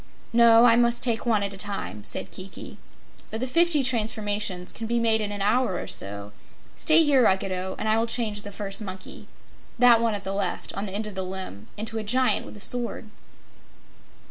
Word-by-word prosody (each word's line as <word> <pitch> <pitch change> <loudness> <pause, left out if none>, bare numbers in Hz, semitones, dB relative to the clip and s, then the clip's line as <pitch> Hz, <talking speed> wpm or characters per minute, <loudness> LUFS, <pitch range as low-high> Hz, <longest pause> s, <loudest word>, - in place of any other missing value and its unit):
"No, 230 0 +6
I 230 -1 +6
must 235 0 +2
take 235 -1 +1
one 215 -3 +2
at 200 0 -2
a - - -7
time," 195 - -3
said - - -5
Kiki. 185 0 -10 0.5
"But 220 - -4
the 255 - -1
fifty 330 +1 +3
transformations 210 -6 -1
can 225 - -6
be 235 +1 0
made 225 -1 +2
in 205 -1 -3
an 205 -1 -4
hour 220 -2 +1
or - - -6
so. 100 +1 -4 0.4
Stay 325 0 +6
here, 280 -4 +4
Ruggedo, 190 -2 0
and 220 - -4
I 220 +1 +2
will 230 - 0
change 220 -3 0
the 205 - -9
first 200 0 -2
monkey 190 -2 -9 0.5
that 240 -1 +6
one 230 -2 +1
at 200 - -7
the 195 - -4
left, 195 -2 -3
on 200 +1 -4
the 190 - -6
end 215 +1 -2
of 210 - -7
the 190 - -4
limb 185 - -6
into 225 +1 -4
a - - -4
Giant 255 +5 +1
with - - -11
a - - -12
sword." 235 -1 -3
215 Hz, 205 wpm, -25 LUFS, 195-235 Hz, 0.5 s, No